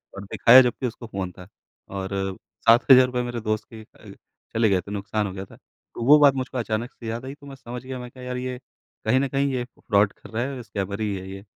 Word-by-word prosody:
और 100 - -7
दिखाया 125 +3 +8
जबकि 125 +1 0
उसको 120 0 -8
फ़ोन 95 -4 -4
था। 90 0 -13 0.4
और 95 -1 -4 0.6
₹7000 125 +1 +6
मेरे 120 -1 -4
दोस्त 110 0 -2
के 110 - -9
अ, - - -15 0.4
चले 115 -1 +3
गए 95 -2 +2
थे, 100 - -11
नुकसान 105 +1 -2
हो 95 - -6
गया 95 0 -6
था। - - -16 0.4
तो 115 - -4
वो 150 +4 +8
बात 145 -2 +7
मुझको 130 -1 -4
अचानक 115 +1 -2
से 115 - -11
याद 115 +3 -4
आई 135 - -6
तो 145 -1 -15
मैं 135 - -9
समझ 125 -2 -8
गया, 130 -1 -5
मैं 125 0 -8
कहा 130 0 -12
यार 125 0 -4
ये 125 0 -4 0.5
कहीं 120 +4 +3
न 140 - +1
कहीं 135 +1 0
ये 125 - -1
फ्रॉड 105 -4 0
कर - - -15
रहा 115 +2 -2
है 135 +1 -4
और 125 - -6
स्कैमर 100 -1 -4
ही 105 -2 -1
है 95 0 -7
ये। 95 0 -8
120 Hz, 250 wpm, -24 LUFS, 100-130 Hz, 0.6 s, दिखाया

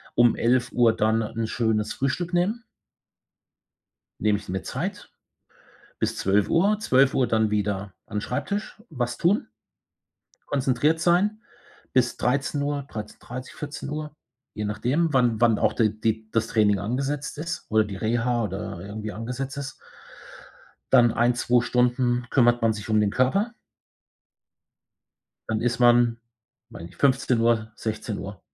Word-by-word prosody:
Um 120 -1 +5
11:00 120 -1 +3
dann 110 +1 +2
'n 115 +1 -3
schönes 110 -3 0
Frühstück 165 +7 -2
nehmen. 210 +7 0 1.6
Nehme 105 -1 +3
ich - - -12
mir 95 0 -2
Zeit - - -5 0.9
bis - - -1
12:00. 165 - +2
12:00 135 - +3
dann 110 -2 +2
wieder 100 -2 -2
an 105 -1 -4
Schreibtisch, 200 - -4
was 120 -3 -2
tun. 190 +5 +2 1.0
Konzentriert 145 +4 +1
sein 200 +6 +2 0.5
bis 130 -2 +2
13:00, 140 +2 -1
13:30, 120 +4 -8
14:00, 150 +1 -6 0.4
je 105 - -4
nachdem, 125 +10 0
wann 120 -3 +2
wann 115 -2 +4
auch - - +2
der 110 -2 +2
die 110 +1 -3
das 115 0 +1
Training 105 -3 +2
angesetzt 135 +8 -3
ist 165 +2 -5
oder 110 0 +4
die 100 -2 -7
Reha 120 +2 0
oder 105 -3 -5
irgendwie 105 +3 -6
angesetzt 125 +5 -5
ist. 135 -1 -5 1.2
Dann 120 -3 +6
1, 120 0 +2
2 120 0 +2
Stunden 125 0 +1
kümmert 120 -2 +3
man 115 -1 +3
sich 105 +1 -8
um 110 0 +3
den 105 -1 +2
Körper. 195 - +1 2.0
Dann 110 0 -1
ist 120 0 0
man 120 -1 +5 0.5
weiß 115 -8 -10
nicht, 85 +1 -11
15:00, 120 -4 +2
16:00. 105 -3 -5
120 Hz, 130 wpm, -25 LUFS, 110-140 Hz, 2.0 s, Dann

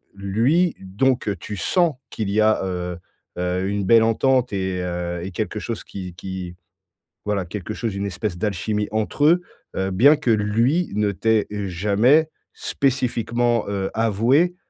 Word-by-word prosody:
lui 115 - +1
donc, 120 +8 0
heu, 100 - 0
tu 105 +4 -7
sens 165 - +2
qu'il 110 -3 -3
y 105 +2 +1
a, 110 -1 +3
heu 90 -2 -3 0.4
heu, 90 +1 -1
une 100 0 -1
belle 110 +4 +5
entente 125 +2 +2
et 95 -2 -1
heu 90 -1 -3
et 95 - -5
quelque 85 - -3
chose - - -5
qui 90 -2 -8
qui, 90 -1 -6 0.7
voilà, 105 -2 0
quelque 100 +3 -6
chose, 110 -3 -3
une 100 +1 -2
espèce 100 -1 -3
d'alchimie 105 +2 -1
entre 110 +7 0
eux. 170 +4 +5 0.3
Heu, 95 0 -1
bien 130 +11 +6
que 150 -5 0
lui 115 +11 +2
ne 105 -1 +1
t'ait 110 +3 +1
jamais 105 - +2 0.2
spécifiquement, 120 -3 0
heu, 100 -1 -2
avoué, 115 - +2
105 Hz, 155 wpm, -22 LUFS, 95-120 Hz, 0.7 s, bien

